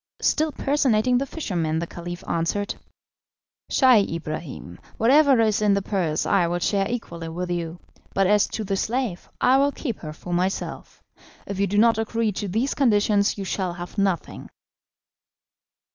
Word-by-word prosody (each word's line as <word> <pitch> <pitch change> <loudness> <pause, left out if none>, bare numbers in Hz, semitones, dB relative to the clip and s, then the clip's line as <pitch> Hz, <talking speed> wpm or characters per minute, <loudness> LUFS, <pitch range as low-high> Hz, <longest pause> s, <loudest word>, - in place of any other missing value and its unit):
Still 310 0 +2
personating 250 -4 +2
the 275 - -2
fisherman, 170 - -2
the 170 - -1
Caliph 175 +1 -8
answered: 170 +5 -1 1.0
"Scheih 240 - +4
Ibrahim, 155 - -6 0.2
whatever 275 +2 +5
is 215 -1 +2
in 205 -2 +3
the 200 - -1
purse 175 -7 -1
I 185 -4 +3
will 175 +1 -1
share 195 +3 0
equally 170 -9 -5
with 175 +2 -4
you, 170 0 -3 0.4
but 195 - +3
as 210 +2 +4
to 220 - -4
the 195 -1 -1
slave 225 -3 -2
I 260 +1 +4
will 280 +1 +3
keep 245 -7 -5
her 155 - -7
for 175 +3 -7
myself. 185 +2 -3 0.4
If 200 -1 -5
you 200 - +2
do 205 +2 -1
not 225 +1 +4
agree 225 0 0
to 205 +1 -4
these 225 +9 0
conditions 210 -5 +2
you 200 - -4
shall 185 -1 -2
have 175 +3 -7
nothing." 195 -3 -2
200 Hz, 160 wpm, -24 LUFS, 175-230 Hz, 1.0 s, whatever